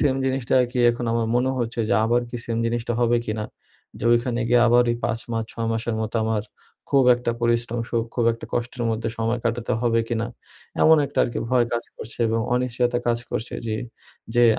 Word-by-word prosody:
Same 140 -3 +3
জিনিসটা 130 -1 0
আর 125 - +2
কি 125 - -2
এখন 120 +1 -4
আমার 115 -1 +1
মনে 125 +2 +2
হচ্ছে 120 0 -2
যে - - +3
আবার 120 +2 +2
কি 120 - -4
সেম 115 -1 -2
জিনিসটা 120 0 -1
হবে 120 0 +3
কিনা। 110 0 -2 0.5
যে - - -6
ঐখানে 120 0 +1
গিয়ে 120 0 +5
আবার 120 +1 +6
ওই 120 - 0
৫ 115 - 0
মাস 115 -1 -1
৬ 115 -1 -3
মাসের 115 0 -2
মতো 110 +1 -2
আমার 110 -2 0 0.5
খুব 135 -2 +4
একটা 120 -1 -2
পরিশ্রম 120 0 0
সুখ 115 -1 0
খুব 120 - +1
একটা 115 - -8
কষ্টের 120 0 -2
মধ্যে 115 +1 -2
সময় 115 +2 0
কাটাতে 115 +1 -1
হবে 115 -1 +3
কিনা। 115 -1 -1 0.6
এমন 160 0 +7
একটা 140 - -6
আরকি 120 - -3
ভয় 125 -2 +3
কাজ 120 - -1
করছে 115 - -9
এবং 115 0 +1
অনিশ্চয়তা 125 -1 0
কাজ 120 0 +2
করছে 115 - -3
যে, 110 - -1 0.6
যে 120 - +5
120 Hz, 205 wpm, -23 LUFS, 115-120 Hz, 0.6 s, এমন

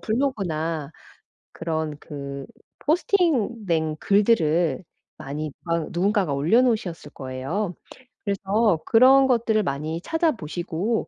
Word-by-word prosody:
블로그나 170 - -1 0.6
그런 160 -2 -3
그 140 -2 -7 0.3
포스팅된 235 - +1
글들을 175 - +2 0.3
많이 150 0 -5
막 170 -2 -1
누군가가 190 -3 +1
올려놓으셨을 210 - +1
거예요. 140 +9 -4 0.5
그래서 200 -2 +1
그런 265 +3 +6
것들을 230 -3 +2
많이 155 +2 -3
찾아보시고 210 - -1
180 Hz, 245 characters per minute, -24 LUFS, 155-225 Hz, 0.6 s, 그런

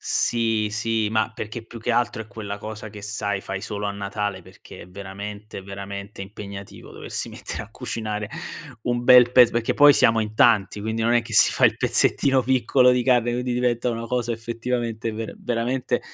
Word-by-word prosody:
Sì, 115 -2 +1
sì, 110 0 0
ma 110 0 0
perché 110 +1 -6
più 115 - -10
che 120 - -1
altro 120 -1 0
è 110 - -17
quella 105 -4 -6
cosa 110 +1 -7
che 105 0 -11
sai, 105 -1 -2
fai 95 0 -5
solo 105 0 -5
a - - -1
Natale 100 -1 -4
perché - - -13
è - - -14
veramente, 100 +2 -8
veramente 100 +1 -7
impegnativo 100 -1 -9
doversi - - -5
mettere - - -6
a - - -19
cucinare, 105 -2 -4 0.5
un 120 +1 -1
bel 125 -1 +7
pez 125 -2 +7
perché 115 -1 -1
poi 145 0 +8
siamo 115 -3 +4
in 110 0 -4
tanti, 105 -3 +3
quindi 110 +1 -2
non 120 +1 +2
è 120 - +3
che 115 - -10
si - - +6
fa - - +2
il - - +4
pezzettino 135 -2 +2
piccolo 130 0 +3
di 125 -1 +1
carne, 120 -2 +3
quindi 125 +1 -2
diventa 125 0 0
una 115 0 -4
cosa 120 -1 -1
effettivamente 115 0 -3
ver 110 0 -6
veramente 120 +2 -1
110 Hz, 190 wpm, -23 LUFS, 105-120 Hz, 0.5 s, poi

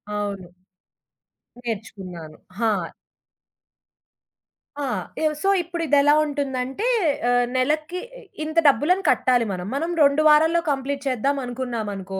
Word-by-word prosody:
అవును. 200 -3 -4 1.2
నేర్చుకున్నాను. 190 -8 -7 0.2
హా! 225 -1 +2 2.1
ఆ! - - -1 0.4
ఎవ 310 - +3
సో, 390 - +2
ఇప్పుడిదేలా 300 -4 +2
ఉంటుందంటే 275 - -3 0.4
ఆహ్, 245 0 +3
నెలకి 305 +7 0 0.4
ఇంత 315 +1 -5
డబ్బులను 355 +7 +3
కట్టాలి 245 -2 +3
మనం. 180 -1 -4
మనం 325 +4 -1
2 280 +2 +4
వారాల్లో 320 +3 +4
కంప్లీట్ 275 0 -3
చేద్దామనుకున్నామనుకో, 240 -7 -3
265 Hz, 95 wpm, -23 LUFS, 225-300 Hz, 2.1 s, 2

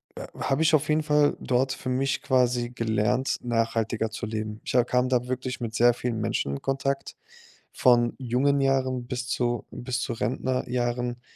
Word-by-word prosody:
äh, - - -6
habe 135 +4 +1
ich 160 0 +3
auf 150 0 0
jeden 155 0 +2
Fall 150 -1 +3
dort 130 +1 +1
für 130 - -6
mich 135 +2 0
quasi 125 -2 +2
gelernt, 110 +2 0
nachhaltiger 115 -1 0
zu 115 +2 -5
leben. 110 0 -4
Ich - - -3
ha 125 - +6
kam 125 +1 +1
da 125 -1 +1
wirklich 130 0 -3
mit 115 -2 -4
sehr 120 +1 +5
vielen 120 -2 -3
Menschen 70 -8 -1
in 70 - -5
Kontakt, 135 0 -2 0.6
von 120 -2 +3
jungen 135 +3 +1
Jahren 130 -2 +1
bis 125 0 -4
zu 120 -2 -1
bis 125 0 -3
zu - - -2
Rentnerjahren, 125 0 -2
125 Hz, 175 wpm, -26 LUFS, 120-130 Hz, 0.6 s, ha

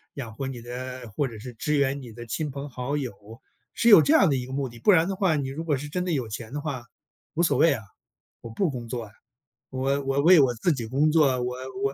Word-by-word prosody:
养 120 -6 -6
活 135 +4 -4
你 130 -3 -6
的 125 0 -7
或 145 - +1
者 115 -4 -9
是 125 +2 -8
支 150 +7 -1
援 140 0 +1
你 120 -3 -10
的 120 +2 -9
亲 150 +7 -3
朋 140 +1 -6
好 130 +3 -3
友， 130 -7 -3 0.6
是 235 - 0
有 205 -7 +10
这 295 - +3
样 285 - +6
的 140 - +2
一 125 -1 -3
个 130 - -10
目 135 -1 -1
的。 120 0 -13
不 205 - +4
然 170 -3 +4
的 195 - -2
话 185 -5 +2
你 135 -2 -2
如 155 +5 -5
果 150 -4 0
是 150 - -6
真 180 +3 -2
的 180 - -1
有 130 -7 -1
钱 110 +1 -7
的 145 - -2
话， 140 -5 -4 0.5
无 170 - +2
所 170 - +2
谓 165 - +5
啊， 115 -5 -5 0.6
我 115 - -8
不 175 - 0
工 125 -4 -6
作 120 0 -4
啊。 105 - -15 0.6
我 135 +2 -1
我 135 +1 +1
为 175 +3 +7
我 130 -4 +4
自 120 +10 +1
己 120 -5 -4
工 140 +6 +2
作， 140 -5 +3
我 125 0 -2 0.3
我 135 0 +1
135 Hz, 285 characters per minute, -26 LUFS, 125-150 Hz, 0.6 s, 有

